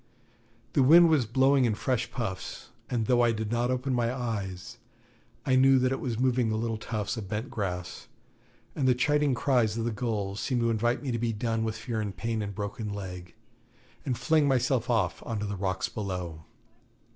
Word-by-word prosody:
The 140 - +4
wind 165 +6 +8
was 145 -8 +3
blowing 135 +3 +4
in 110 -3 +1
fresh 120 -1 -1
puffs, 95 -6 -5 0.2
and 115 -3 0
though 120 +1 +3
I 120 -1 +4
did 110 -1 -3
not 120 +1 +1
open 130 +1 -1
my 120 -1 +1
eyes, 105 -8 -4 0.7
I 130 - +3
knew 135 +1 +6
that 130 0 +2
it 135 - -1
was 120 -4 -3
moving 125 -2 +2
the 110 - 0
little 115 -1 -2
tufts 110 0 -3
of 100 -4 -6
bent 110 +3 -3
grass, 90 -4 -4 0.7
and 135 - +1
the 125 - +4
chiding 145 +1 +2
cries 120 -5 +1
of 115 - -1
the 120 - 0
gulls 105 -4 -2
seemed 125 -3 0
to 115 0 +2
invite 120 +4 0
me 135 - -2
to 115 - -1
be 115 0 0
done 115 +1 -1
with 110 0 -2
fear 110 0 -3
and 100 -4 -5
pain 115 +2 -2
and 100 -1 -5
broken 105 +1 -4
leg, 90 -3 -7 0.7
and 125 -4 -2
fling 150 +4 +3
myself 130 -2 +1
off 100 -7 +1
on 115 -3 -3
to 105 - -2
the 100 0 -3
rocks 95 -1 -1
below. 90 -6 -5
115 Hz, 200 wpm, -28 LUFS, 105-125 Hz, 0.7 s, wind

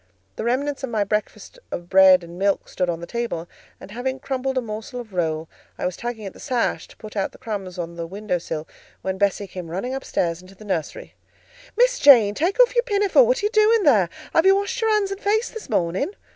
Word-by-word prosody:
The - - -4
remains 275 +4 -1
of 265 - -2
my 220 -3 +1
breakfast 210 - -4
of 175 - -5
bread 190 -1 +6
and 170 +1 -10
milk 200 0 +1
stood 180 -1 -2
on 170 -1 -3
the - - -5
table, 205 -5 -4 0.3
and - - -12
having 260 +4 -3
crumbled 265 0 -2
a - - +2
morsel 220 +2 -6
of 225 -5 -10
roll, 160 -2 -1 0.3
I - - -3
was 180 - -2
tugging 235 -3 -5
at 195 - -6
the - - -15
sash 250 -4 -1
to - - -18
put 215 -1 -11
out 195 -2 -1
the - - -14
crumbs 200 -7 -6
on 170 -1 -5
the 165 -1 -4
window 195 0 -3
sill, 160 -1 -5 0.4
when 190 0 -3
Bessie 200 0 +1
came 180 -3 -8
running 195 +10 -3
upstairs 175 -10 -2
into 185 +1 -16
the 215 - -14
nursery. 180 -6 -4 0.6
"Miss - - +3
Jane, 235 -8 +7
take 350 - -1
off - - +6
your 480 - +4
pinafore; 415 +1 +3
what - - +1
are - - +2
you 420 - +1
doing 430 0 +4
there? 210 - +4 0.2
Have 325 +3 +4
you 385 - +7
washed 400 +4 -2
your 445 - +2
hands 420 -2 +2
and 395 +1 -5
face 435 +3 +1
this 450 - -9
morning?" 180 - 0
215 Hz, 230 wpm, -23 LUFS, -, 0.6 s, Jane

